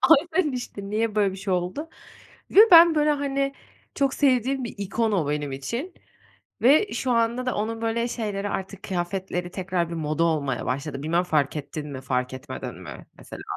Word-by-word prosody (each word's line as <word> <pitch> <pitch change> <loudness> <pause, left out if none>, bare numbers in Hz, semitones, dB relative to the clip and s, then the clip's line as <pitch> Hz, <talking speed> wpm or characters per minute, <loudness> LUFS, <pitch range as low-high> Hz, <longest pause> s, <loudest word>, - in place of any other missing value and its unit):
Aynen 325 0 +4
işte, 205 -5 -6
niye 220 0 0
böyle 200 -2 +2
bir - - -7
şey 195 0 -3
oldu? 185 - -2 0.6
Ve - - +6
ben, 335 -1 +9
böyle, 300 0 +3
hani, 275 -1 -1 0.4
çok 275 -1 +1
sevdiğim 265 -1 +2
bir 235 - -6
ikon 210 +3 -1
o 170 -8 0
benim 145 -1 -2
için 235 - -4 0.7
ve 300 - +5
şu 260 - -2
anda 235 +2 +1
da 255 - 0
onun 225 +2 -3
böyle 230 +1 0
şeyleri, 205 -4 -3
artık 195 0 -5
kıyafetleri 180 -1 -3
tekrar 180 -2 -2
bir - - -4
moda 155 +1 0
olmaya 145 -5 -1
başladı. 140 +1 -3
Bilmem 170 +3 +1
fark 150 -3 0
ettin 150 +1 -6
mi, 135 -2 -6
fark 125 0 -2
etmedin 130 - -7
mi - - -10
mesela? - - -10
200 Hz, 175 wpm, -25 LUFS, 165-255 Hz, 0.7 s, ben